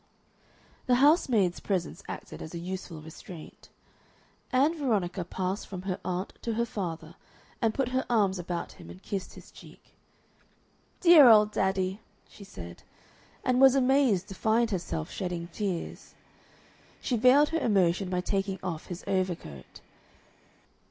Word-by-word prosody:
The 250 - +4
housemaid's 245 - +3
presence 185 -4 -3
acted - - -8
as 160 - -8
a - - -3
useful 175 -2 -6
restraint. 160 +1 -12 0.8
Ann 280 +6 +3
Veronica 200 - -1
passed 185 +3 -3
from 185 -2 -7
her 190 0 -3
aunt 185 +2 -3
to 230 -2 -2
her 235 +1 +1
father, 170 -7 -5 0.5
and 225 - +3
put 255 +2 -1
her 260 +1 0
arms 200 -5 +2
about 175 0 -4
him 85 - -13
and 90 +2 -12
kissed 195 -2 -5
his - - -14
cheek. - - -16 1.1
"Dear 335 -8 +9
old 210 -1 +6
daddy!" 190 0 0 0.3
she 205 - -14
said, 85 - -10 0.6
and 255 0 +2
was 270 0 +7
amazed 260 -8 +3
to - - -6
find 225 +3 +1
herself 85 - -3
shedding 175 -2 -4
tears. 185 -2 -5 0.8
She 250 - -1
veiled 255 +6 +5
her 330 - 0
emotion 190 - +2
by 180 -1 -1
taking 195 +1 -2
off 170 -4 -4
his 175 0 -7
overcoat. 180 - -3
195 Hz, 140 wpm, -28 LUFS, 175-235 Hz, 1.1 s, Dear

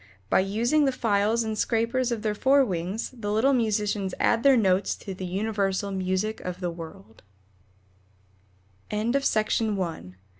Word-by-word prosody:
By - - +5
using 235 +10 +2
the 270 - +2
files 220 -1 +1
and 220 -1 -3
scrapers 235 +3 0
of 230 -3 -3
their 215 -1 0
fore 270 +5 +4
wings 185 +2 -3
the 225 -5 -5
little 235 +6 +3
musicians 210 -5 0
add 230 - +2
their 275 -1 +5
notes 190 -3 +2
to 195 - -8
the 185 0 -6
universal 200 0 -1
music 190 +3 -1
of 180 0 -5
the 175 -2 -2
world 160 - -11 1.7
ELLANORA 230 +6 0
KINSLEY 220 -2 +1
MARBLE. 170 - -4
210 Hz, 150 wpm, -26 LUFS, 190-230 Hz, 1.7 s, By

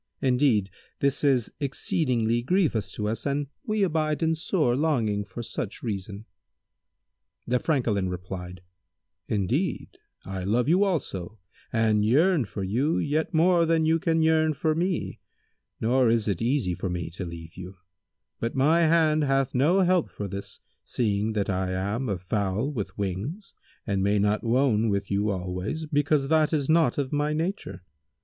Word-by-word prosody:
Indeed 125 -7 +2 0.3
this 140 +1 +1
is 130 -5 +2
exceeding 135 -3 0 0.2
grievous 135 - +1
to 105 - -3
us 110 +5 -3
and 140 +1 0 0.2
we 215 -2 +1
abide 155 -3 0
in 160 0 +2
sore 160 -5 0
longing 120 -9 0
for 110 +4 -8
such 110 -1 -5
reason." 100 -1 -5 1.2
The 125 +1 +1
Francolin 115 - 0
replied, 90 0 -7 0.6
"Indeed, 120 - -1 0.3
I 95 0 -5
love 115 +6 +1
you 180 +6 +4
also 110 - -2 0.3
and 110 -3 +2
yearn 150 - +3
for 100 0 -6
you 125 - 0
yet 155 +2 0
more 170 +1 +3
than 165 -1 +2
you 160 +1 +3
can 165 -2 +1
yearn 160 -1 +3
for 155 +2 0
me, 175 +2 -2 0.6
nor 125 +2 +3
is 115 -1 +1
it 100 -4 -1
easy 120 -6 +1
for 95 - -4
me 85 -2 -4
to 95 +3 -6
leave 85 -1 -9
you; 90 +1 -9 0.6
but 115 - -3
my 150 +6 +4
hand 160 -2 +3
hath 135 -1 +1
no 160 +10 +3
help 180 -2 +2
for 100 - -6
this, 100 +1 -7 0.2
seeing 105 -1 -1
that 105 -2 -1
I 95 -1 -1
am 100 +7 -2
a 100 - -1
fowl 100 - -1
with 100 -8 -5
wings 105 - -4 0.3
and 100 -3 -1
may 100 +2 +2
not 105 +1 +1
wone 115 -2 +2
with 100 -1 -2
you 100 +2 +1
always, 95 - -3
because 145 -1 +1
that 155 0 +3
is 145 -3 0
not 165 -1 +3
of 140 -1 -2
my 150 +1 0
nature. 155 - -3
125 Hz, 160 wpm, -26 LUFS, 100-155 Hz, 1.2 s, you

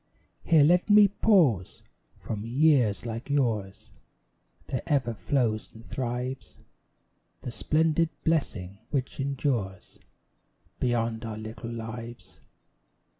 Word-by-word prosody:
Here 160 -3 +5
let 175 +6 +3
me 205 0 +8
pause! 165 - +2 0.3
From 105 -2 -5
years 125 -3 +2
like 115 +4 -5
yours 115 -9 -1 0.7
There 130 - -3
ever 135 -7 +1
flows 110 -1 -1
and 115 +1 -13
thrives 125 +1 -4 0.9
The 125 - -5
splendid 160 +5 +1
blessing 105 - -1
which 135 -2 -3
endures 130 -8 -2 0.8
Beyond 115 -2 0
our 110 -2 -5
little 110 +2 -7
lives. 115 -6 -8
120 Hz, 100 wpm, -27 LUFS, 110-145 Hz, 0.9 s, me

